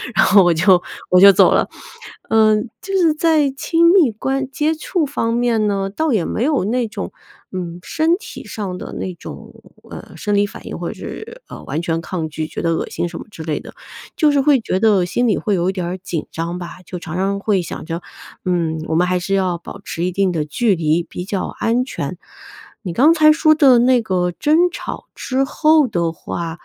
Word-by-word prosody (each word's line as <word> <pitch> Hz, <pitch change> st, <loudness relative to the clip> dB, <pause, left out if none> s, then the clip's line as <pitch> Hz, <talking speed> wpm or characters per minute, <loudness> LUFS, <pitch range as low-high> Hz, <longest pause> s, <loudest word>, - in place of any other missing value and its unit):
然 -, -, +5 dB
后 195 Hz, 0 st, +6 dB
我 175 Hz, -1 st, +4 dB
就 180 Hz, +2 st, +4 dB, 0.3 s
我 180 Hz, -, +5 dB
就 200 Hz, 0 st, +10 dB
走 -, -, +5 dB
了。 -, -, +2 dB, 0.6 s
嗯， 215 Hz, 0 st, +3 dB
就 390 Hz, -, -6 dB
是 335 Hz, -4 st, +3 dB
在 310 Hz, -2 st, +2 dB
亲 335 Hz, +4 st, +3 dB
密 320 Hz, -, +5 dB
关 270 Hz, +5 st, -2 dB
接 300 Hz, +3 st, 0 dB
触 315 Hz, +1 st, -1 dB
方 230 Hz, -4 st, -2 dB
面 235 Hz, -3 st, +1 dB
呢， 195 Hz, -1 st, -1 dB
倒 310 Hz, +9 st, -1 dB
也 205 Hz, -6 st, +1 dB
没 230 Hz, -, -2 dB
有 290 Hz, -8 st, +1 dB
那 235 Hz, +3 st, 0 dB
种， -, -, -6 dB, 0.4 s
嗯， 175 Hz, -2 st, -5 dB
身 320 Hz, +2 st, +1 dB
体 430 Hz, -, -10 dB
上 190 Hz, -4 st, -5 dB
的 -, -, -8 dB
那 185 Hz, -, -4 dB
种， -, -, -10 dB, 0.4 s
呃， -, -, -10 dB
生 205 Hz, -1 st, -2 dB
理 205 Hz, 0 st, +3 dB
反 -, -, -12 dB
应， -, -, -6 dB
或 -, -, -4 dB
者 -, -, -4 dB
是， 465 Hz, +3 st, -9 dB
呃， -, -, -9 dB
完 150 Hz, +5 st, -3 dB
全 165 Hz, -1 st, -1 dB
抗 165 Hz, -2 st, -4 dB
拒， 155 Hz, 0 st, -4 dB
觉 -, -, -6 dB
得 165 Hz, -1 st, +1 dB
恶 -, -, -3 dB
心 175 Hz, -, -3 dB
什 170 Hz, -, -8 dB
么 -, -, -9 dB
之 165 Hz, -6 st, -9 dB
类 155 Hz, -2 st, -2 dB
的。 -, -, -12 dB, 0.4 s
就 300 Hz, -2 st, +3 dB
是 285 Hz, -, +2 dB
会 275 Hz, -3 st, +3 dB
觉 185 Hz, -, -1 dB
得 205 Hz, -3 st, +3 dB
心 240 Hz, +8 st, 0 dB
里 210 Hz, -, +2 dB
会 205 Hz, -2 st, 0 dB
有 175 Hz, +1 st, 0 dB
一 -, -, -2 dB
点 185 Hz, -2 st, -3 dB
儿 180 Hz, +2 st, -4 dB
紧 175 Hz, -4 st, -5 dB
张 170 Hz, +2 st, -4 dB
吧。 175 Hz, -1 st, -8 dB
就 180 Hz, -, -6 dB
常 170 Hz, -1 st, -6 dB
常 195 Hz, +1 st, 0 dB
会 200 Hz, -3 st, +1 dB
想 170 Hz, -, -7 dB
着， 165 Hz, +2 st, -4 dB, 0.4 s
嗯， 170 Hz, -3 st, 0 dB
我 160 Hz, -, -1 dB
们 175 Hz, +2 st, +3 dB
还 180 Hz, 0 st, +1 dB
是 195 Hz, +3 st, -3 dB
要 185 Hz, -3 st, 0 dB
保 200 Hz, +4 st, -11 dB
持 170 Hz, -2 st, -3 dB
一 180 Hz, -, -2 dB
定 195 Hz, -1 st, +1 dB
的 155 Hz, -3 st, -2 dB
距 205 Hz, +8 st, +1 dB
离 160 Hz, +1 st, +1 dB
比 180 Hz, +1 st, -7 dB
较 195 Hz, -1 st, -2 dB
安 240 Hz, +2 st, +1 dB
全。 265 Hz, -, -5 dB, 0.7 s
你 175 Hz, -3 st, -4 dB
刚 295 Hz, -, +5 dB
才 310 Hz, -2 st, +6 dB
说 310 Hz, 0 st, +4 dB
的 275 Hz, -5 st, +5 dB
那 250 Hz, 0 st, +4 dB
个 180 Hz, -4 st, -1 dB
争 300 Hz, -, +1 dB
吵 -, -, -7 dB
之 265 Hz, +1 st, -1 dB
后 305 Hz, +2 st, +3 dB
的 170 Hz, -5 st, -1 dB
话， 165 Hz, 0 st, -6 dB
200 Hz, 240 characters per minute, -19 LUFS, 175-270 Hz, 0.7 s, 就